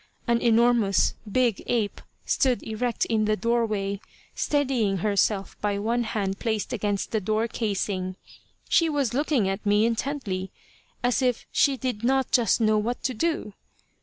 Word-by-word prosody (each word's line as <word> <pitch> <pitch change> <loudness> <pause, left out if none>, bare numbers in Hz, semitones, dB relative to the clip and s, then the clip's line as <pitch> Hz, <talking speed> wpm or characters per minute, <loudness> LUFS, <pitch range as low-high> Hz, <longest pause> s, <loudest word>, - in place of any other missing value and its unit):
An 235 0 +2
enormous 230 -3 +3 0.2
big 240 -2 +2
ape 220 -4 -1 0.2
stood 255 -3 +1
erect 230 +2 -1
in 220 -2 +1
the 215 0 +2
doorway, 215 -2 -1 0.3
steadying 255 -9 +1
herself 200 -1 +1
by 205 -1 0
one 230 +4 0
hand 195 -3 -2
placed 220 0 -2
against 205 -3 -2
the 220 - 0
door 215 +3 0
casing. 195 -4 -2 0.5
She 330 -1 +3
was 280 -6 0
looking 275 -6 +1
at 195 +2 -2
me 210 +1 +3
intently, 230 -6 -2 0.5
as 245 +2 +2
if 250 -2 0
she 275 -2 +3
did 245 -4 -3
not 265 +1 +1
just 235 -4 +3
know 215 -1 +3
what 235 +3 -3
to 260 - 0
do. 280 -4 -2
225 Hz, 150 wpm, -26 LUFS, 205-245 Hz, 0.5 s, enormous